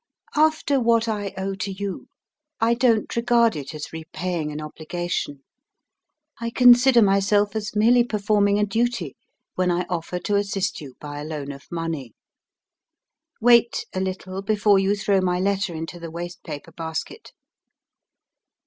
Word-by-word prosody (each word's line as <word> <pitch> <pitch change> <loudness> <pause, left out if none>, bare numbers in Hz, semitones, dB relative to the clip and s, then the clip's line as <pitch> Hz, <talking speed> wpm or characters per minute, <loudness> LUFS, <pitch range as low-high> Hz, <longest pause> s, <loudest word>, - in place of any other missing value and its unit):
"After 305 -2 +3
what 230 -1 +2
I 205 -3 -2
owe 195 +1 -2
to 195 +1 -4
you, 195 0 -5 0.5
I 230 +1 +3
don't 235 -3 +2
regard 235 -2 +3
it 145 +1 -6
as 155 +1 -7
repaying 160 0 -4
an 150 - -5
obligation; 155 -2 -4 1.0
I 235 0 -2
consider 245 0 +6
myself 200 +1 +2
as 210 -1 -4
merely 235 +3 +5
performing 205 -2 +1
a 210 - +2
duty 210 - -1 0.4
when 185 0 0
I 175 0 0
offer 175 +1 -3
to 205 +3 0
assist 195 -3 -1
you 135 -4 -10
by 145 -1 -7
a - - -5
loan 150 -2 -5
of 140 0 -12
money. 165 -8 -4 1.2
"Wait 235 0 +4
a 185 - -2
little 190 0 -4
before 205 0 +3
you 195 +1 +2
throw 200 -1 +1
my 180 -1 0
letter 195 -2 0
into 165 +2 -6
the 165 -1 -7
waste 175 +2 -7
paper 155 0 -8
basket. 165 - -6
195 Hz, 150 wpm, -23 LUFS, 165-220 Hz, 1.2 s, consider